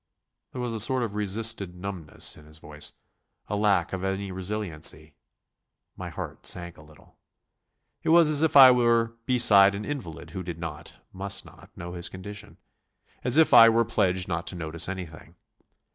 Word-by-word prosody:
There 130 - -8
was 120 -2 -3
a 110 - -3
sort 125 +3 +3
of 110 -4 -4
resisted 105 -2 -1
numbness 90 -4 -5
in 75 - -17
his 75 0 -13
voice, 75 -1 -6 0.5
a 105 - -3
lack 100 -5 +1
of 95 -1 -4
any 95 0 -3
resiliency. 90 -5 -2 0.8
My - - -7
heart - - -8
sank 85 0 -4
a - - -16
little. 75 0 -21 0.8
It - - -3
was 165 0 +6
as 150 -1 +4
if 160 -2 +3
I 130 -2 +10
were 115 -2 +2
beside 100 -6 +5
an 105 +1 -6
invalid 100 - -7
who 95 - -6
did 85 -2 -7
not 80 -1 -8 0.2
must 100 +1 -2
not - - -16
know 85 0 -8
his 85 -1 -2
condition; 100 +2 -10 0.7
as 125 +3 +2
if 160 - +4
I 115 0 +9
were 115 +1 +2
pledged 95 -5 0
not 85 -2 -4
to - - -2
notice 80 0 -3
anything. 90 -4 -9
95 Hz, 175 wpm, -26 LUFS, 85-115 Hz, 0.8 s, I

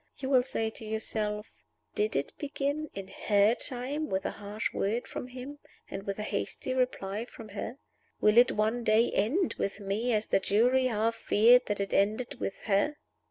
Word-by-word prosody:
You 265 0 -4
will 255 -2 +6
say 225 -3 -2
to 225 - -10
yourself, 215 -1 -3 0.4
'Did 425 +1 0
it - - -1
begin, 290 +1 -2
in 195 -1 -6 0.2
her 205 +1 +5
time, 270 +5 0
with 190 0 -1
a - - 0
harsh 210 +2 -4
word 220 +5 -1
from - - -6
him 260 +3 -8 0.3
and 195 - -6
with 200 - -2
a 210 - -3
hasty 255 - -3
reply 225 -5 -1
from 225 -3 -12
her? 205 +5 -5 0.4
Will 210 +2 +6
it 245 - +6
one 220 +3 0
day 220 +2 +4
end 295 - +1
with 200 +1 -2
me 205 +5 -1
as 215 -1 +1
the - - +2
jury 245 +7 +3
half 225 -1 +1
feared 235 +3 +5
that 205 -1 -1
it 200 0 -2
ended 215 +5 +1
with 195 - -3
her? 210 +9 +2
225 Hz, 185 wpm, -30 LUFS, 210-255 Hz, 0.4 s, will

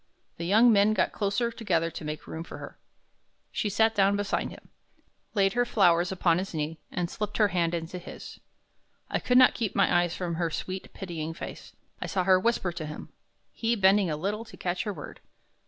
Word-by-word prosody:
The 170 - -4
young 225 +5 +6
men 205 +1 +4
got - - +2
closer 205 +3 0
together 170 -8 0
to - - -7
make 150 0 -5
room 160 - -6
for - - -9
her. - - -10 0.7
She 210 - -1
sat 220 +2 +3
down 200 -1 +3
beside 205 0 -1
him, - - -13 0.7
laid 195 -1 +3
her 245 - +3
flowers 175 -6 +3
upon 175 -2 +2
his 190 -2 -5
knee, 155 +1 -3
and 175 -1 -1
slipped 210 +3 -4
her 210 -2 +4
hand 175 -2 +1
into 170 +2 -5
his. 175 - -10 0.7
I - - +1
could 250 - +2
not 255 -1 +7
keep 225 -5 -3
my - - +3
eyes 175 -1 -2
from 175 -2 -3
her 170 - +1
sweet, 185 +4 -5
pitying 165 -4 -5
face. - - -9 0.3
I - - -3
saw 190 -2 0
her 185 0 +5
whisper 190 -3 0
to 165 -2 -6
him, 150 - -8 0.4
he 230 +1 0
bending 195 -2 +4
a 150 - -2
little 205 +7 -2
to - - -13
catch 180 +4 -2
her 210 - -1
word. 150 -5 -9
190 Hz, 205 wpm, -28 LUFS, 170-210 Hz, 0.7 s, not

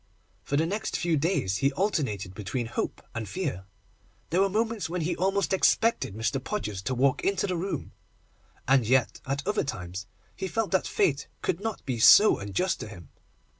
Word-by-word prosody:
For 140 - -1
the 160 - +2
next 200 +5 -2
few 170 -2 +1
days 140 - 0
he 140 0 +2
alternated 125 - -1
between 105 +5 -3
hope 115 - -4
and 115 -2 -4
fear. 145 - -3 0.7
There 180 +3 +3
were 195 - +3
moments 220 -1 -1
when 180 +1 -2
he 170 +3 -1
almost 195 +1 0
expected 190 - +2
Mr. 115 +4 -1
Podgers 105 - -3
to 130 - -1
walk 135 +2 +2
into 195 -1 +1
the 185 -2 -1
room, 185 +3 -3 0.8
and 135 -1 +5
yet 130 -1 +2
at 140 +1 -2
other 210 +1 +1
times 95 - -5 0.3
he 190 - -3
felt 220 +3 -1
that 190 - +2
Fate 140 -3 +1 0.2
could 170 - 0
not 220 0 -4
be 125 -4 -2
so 210 - +8
unjust 100 - -1
to - - -6
him. 85 -8 -11
145 Hz, 180 wpm, -27 LUFS, -, 0.8 s, so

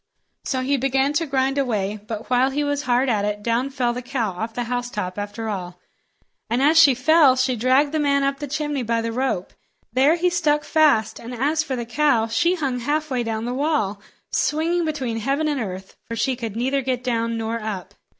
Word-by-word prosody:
So 260 -2 -1
he 275 +2 +1
began 270 +2 +1
to 325 +2 0
grind 270 0 +1
away; 210 -6 -1
but 225 -1 -5
while 250 +1 +4
he 290 +2 -1
was 285 0 -1
hard 250 -1 +1
at 215 -5 +1
it, 210 0 -2
down 235 +4 0
fell 250 -3 -1
the 250 - -5
cow 245 -4 -2
off 220 +6 -5
the 245 - -1
housetop 230 -6 -3
after 205 +2 -5
all, 180 -4 -5 0.7
and 235 +2 +1
as 305 +4 +5
she 280 -5 +7
fell, 280 +1 +5
she 255 0 +1
dragged 260 +5 +3
the 310 - 0
man 280 -1 +2
up 275 0 0
the 290 - -4
chimney 295 -1 -2
by 230 -1 0
the 230 0 -3
rope. 230 -7 -2 0.4
There 275 +6 +4
he 355 +1 +1
stuck 300 -4 +1
fast; 290 -9 +2
and 240 +2 -7
as 295 +6 +1
for 280 -4 -3
the 240 -1 -4
cow, 240 -2 +2
she 340 +11 +1
hung 270 -7 -2
halfway 290 0 -1
down 225 -1 -3
the 245 - -2
wall, 260 -8 0 0.3
swinging 330 +3 +1
between 265 -7 -2
heaven 275 +7 0
and 290 -4 -1
earth, 190 -2 -6
for 230 - -3
she 260 +3 0
could 230 -4 -5
neither 265 +4 0
get 255 -1 -2
down 230 -2 -1
nor 225 +1 -2
up. 200 -3 -5
255 Hz, 210 wpm, -22 LUFS, 230-285 Hz, 0.7 s, she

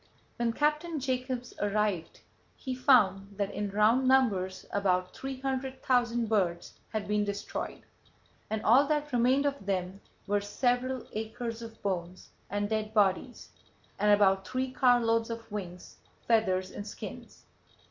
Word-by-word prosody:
When 235 -1 +1
Captain 300 +4 0
Jacobs 255 -1 -3
arrived 205 -4 -1 0.3
he 260 - -5
found 200 -7 +3
that 200 -1 -1
in 205 -1 -2
round 220 +6 +3
numbers 200 -9 +2
about 185 -2 +1
three 270 -1 -6
hundred 265 0 -3
thousand 240 -2 +2
birds 180 -6 0 0.2
had 215 -2 -3
been 210 0 +1
destroyed, 205 0 -4 0.7
and 220 -1 -2
all 260 +6 +5
that 295 -2 -1
remained 255 +4 +3
of 280 -5 -1
them 190 0 -2 0.2
were 205 0 +1
several 245 +4 0
acres 225 +2 -4
of 225 -1 -9
bones 185 -2 -4 0.2
and 205 0 -1
dead 215 0 -2
bodies, 205 +4 +1 0.5
and 210 +1 +4
about 195 -2 +4
three 255 0 -2
carloads 240 -3 +3
of 230 -1 -7
wings, 180 -4 -7 0.3
feathers 190 -5 +2
and 205 - -7
skins. - - -9
220 Hz, 135 wpm, -30 LUFS, 200-255 Hz, 0.7 s, all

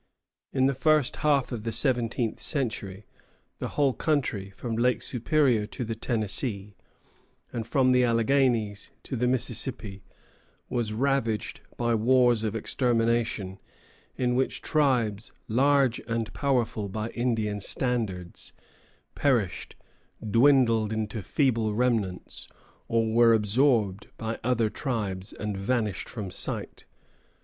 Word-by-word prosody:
In 130 -1 +2
the 135 - +3
first 155 0 +2
half 145 -4 +2
of 120 -3 -4
the 115 - -2
seventeenth 120 -1 0
century 105 -8 -3 0.5
the - - -3
whole 140 -3 +3
country, 130 -12 -1
from 115 +4 -5
Lake 125 +2 +2
Superior 125 -4 +1
to 125 +2 -5
the 115 - -3
Tennessee, 110 -2 -2 0.8
and 115 -2 -4
from 130 +1 +3
the 125 0 +4
Alleghanies 115 -3 +1
to 130 - -5
the 125 +1 +1
Mississippi, 120 -5 -1 0.7
was 120 -3 -1
ravaged 115 -2 -1 0.2
by 120 -1 +1
wars 120 0 +3
of 110 0 -2
extermination, 115 -5 0 0.6
in 125 -1 0
which 130 +2 -1
tribes, 120 -9 +1 0.2
large 135 +1 +3
and 115 -2 -2
powerful 120 -7 0
by 110 +3 -3
Indian 110 -4 -1
standards, 100 -6 -2 0.6
perished, 120 -10 0 0.5
dwindled 115 -2 +4
into 110 0 -3
feeble 115 - +1
remnants, 110 -6 -1 0.4
or 115 -1 +1
were 115 0 +6
absorbed 110 -2 +2
by 110 0 -4
other 120 -2 +2
tribes 105 -7 -3
and 105 -2 -4
vanished 105 +1 -1
from 105 -6 -6
sight. - - -3
115 Hz, 120 wpm, -27 LUFS, 105-130 Hz, 0.8 s, were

